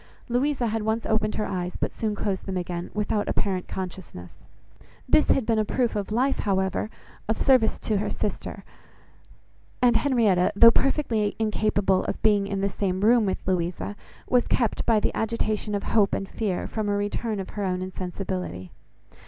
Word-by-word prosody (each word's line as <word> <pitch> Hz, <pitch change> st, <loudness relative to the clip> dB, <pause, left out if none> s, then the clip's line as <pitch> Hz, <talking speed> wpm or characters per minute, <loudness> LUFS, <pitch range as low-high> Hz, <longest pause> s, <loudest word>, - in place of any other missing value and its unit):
Louisa 255 Hz, +1 st, +1 dB
had 225 Hz, 0 st, -1 dB
once 220 Hz, +2 st, -1 dB
opened 215 Hz, -1 st, 0 dB
her 210 Hz, -, -1 dB
eyes, 180 Hz, -1 st, -3 dB
but -, -, -1 dB
soon 215 Hz, -2 st, -2 dB
closed 200 Hz, -1 st, -3 dB
them 190 Hz, -1 st, -2 dB
again, 175 Hz, -1 st, -4 dB
without 210 Hz, 0 st, 0 dB
apparent 185 Hz, -2 st, -1 dB
consciousness. 180 Hz, -, -7 dB, 0.7 s
This 305 Hz, -, +4 dB
had 265 Hz, -, +2 dB
been 225 Hz, -1 st, +2 dB
a -, -, +3 dB
proof 240 Hz, +2 st, 0 dB
of 205 Hz, 0 st, -3 dB
life, 260 Hz, +5 st, +1 dB
however, 190 Hz, +1 st, 0 dB, 0.4 s
of 220 Hz, -, +1 dB
service 255 Hz, -5 st, +3 dB
to 215 Hz, -, 0 dB
her 210 Hz, -, -1 dB
sister; 210 Hz, -, -4 dB, 1.2 s
and 245 Hz, -1 st, +4 dB
Henrietta, 215 Hz, -11 st, +2 dB
though 230 Hz, +3 st, +9 dB
perfectly 230 Hz, -7 st, +1 dB
incapable 210 Hz, -3 st, +1 dB
of -, -, -3 dB
being 205 Hz, -2 st, +3 dB
in 195 Hz, -1 st, -2 dB
the 200 Hz, -, +2 dB
same 190 Hz, -1 st, -2 dB
room 225 Hz, 0 st, +4 dB
with 190 Hz, -, -3 dB
Louisa, 180 Hz, +2 st, -1 dB, 0.3 s
was 245 Hz, -1 st, +2 dB
kept, 235 Hz, -4 st, 0 dB
by 225 Hz, -2 st, +4 dB
the -, -, -1 dB
agitation 215 Hz, -1 st, -1 dB
of 200 Hz, -, -2 dB
hope 210 Hz, -3 st, +2 dB
and 195 Hz, -, -4 dB
fear, 200 Hz, -4 st, -2 dB
from 215 Hz, -2 st, -3 dB
a 205 Hz, -, +1 dB
return 205 Hz, +1 st, -2 dB
of 190 Hz, -, -6 dB
her 205 Hz, -, -4 dB
own 185 Hz, -1 st, -1 dB
insensibility. 185 Hz, -, -5 dB
210 Hz, 175 wpm, -25 LUFS, 190-225 Hz, 1.2 s, though